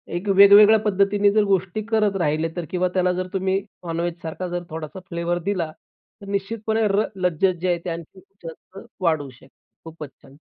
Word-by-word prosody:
एक 180 +4 -4
वेगवेगळ्या 205 +2 +8
पद्धतीने 205 0 +2
जर 215 +1 +3
गोष्टी 190 +2 0
करत 215 -3 +2
राहिले 155 0 0
तर 175 -2 -4
किंवा 185 0 +1
त्याला 185 -1 +2
जर 185 - -3
तुम्ही 190 0 0 0.3
नॉनव्हेजसारखा 170 +1 -4
जर 175 0 -4
थोडासा 160 +3 -7
फ्लेवर 170 0 -2
दिला 180 -4 -2 0.5
तर - - -10
निश्चितपणे 220 +2 -1
र 205 +2 +1
लज्जत 180 0 +1
जे 185 - -1
आहे 175 -1 +1
ते - - -2
आणखीन 170 +3 -8 0.2
जास्त 165 +3 -11 0.2
वाढवू 160 -5 0
शकते. 130 +1 -18 0.4
खूपच 160 -3 -9
छान. 135 0 -17
185 Hz, 170 wpm, -22 LUFS, 165-200 Hz, 0.5 s, वेगवेगळ्या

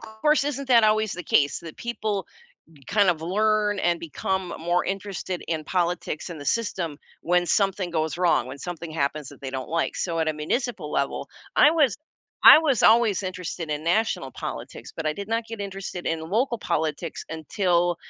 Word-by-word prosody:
course, 225 +8 +1
isn't 275 -2 -3
that 235 -3 +6
always 215 -1 +2
the 180 - -5
case? 145 -2 +2
The 165 -2 -9
people 215 -4 -3 0.4
n 160 - -22
kind 200 -2 +4
of 165 -3 -2
learn 210 +4 +1
and 175 -2 +1
become 180 +3 -3
more 175 +2 +1
interested 195 -2 -4
in 160 -2 -2
politics 175 -2 -2
and 160 - -7
the - - -8
system 180 -9 -1 0.2
when 175 +1 +2
something 190 0 +1
goes 160 -2 -1
wrong, 175 -8 +2
when 130 +2 -7
something 170 +2 -6
happens 150 -2 -2
that 145 - -13
they 135 - -4
don't 130 -1 -5
like, 165 0 -1
so, 170 -2 -2
at 160 -1 +1
a - - +1
municipal 165 - -2
level, 140 - -1 0.3
I 295 - +7
was 300 -8 +3 0.5
I - - +11
was 285 -7 +1
always 220 -4 +5
interested 180 -3 -5
in 150 +1 -3
national 215 +7 +1
politics, - - -7
but 165 - -3
I 155 - +2
did 200 +3 -7
not 225 +1 0
get 225 -2 -7
interested 195 -2 -6
in 165 -1 -1
local 235 +3 +1
politics 160 -3 -2
until 175 +2 0
180 Hz, 185 wpm, -25 LUFS, 160-215 Hz, 0.5 s, I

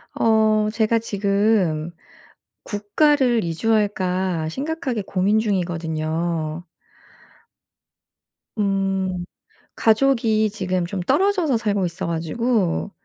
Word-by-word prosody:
어 215 -1 +3
제가 225 0 +1
지금 200 -6 0 0.7
국가를 240 - +1
이주할까 185 -3 0
심각하게 270 - -3
고민 195 +2 +1
중이거든요. 165 -4 -2 1.9
음 195 -3 -1 0.5
가족이 220 -2 +2
지금 185 -3 -2
좀 185 +2 -4
떨어져서 360 - +2
살고 205 -4 0
있어가지고 170 +5 -1
200 Hz, 190 characters per minute, -22 LUFS, 175-225 Hz, 1.9 s, 어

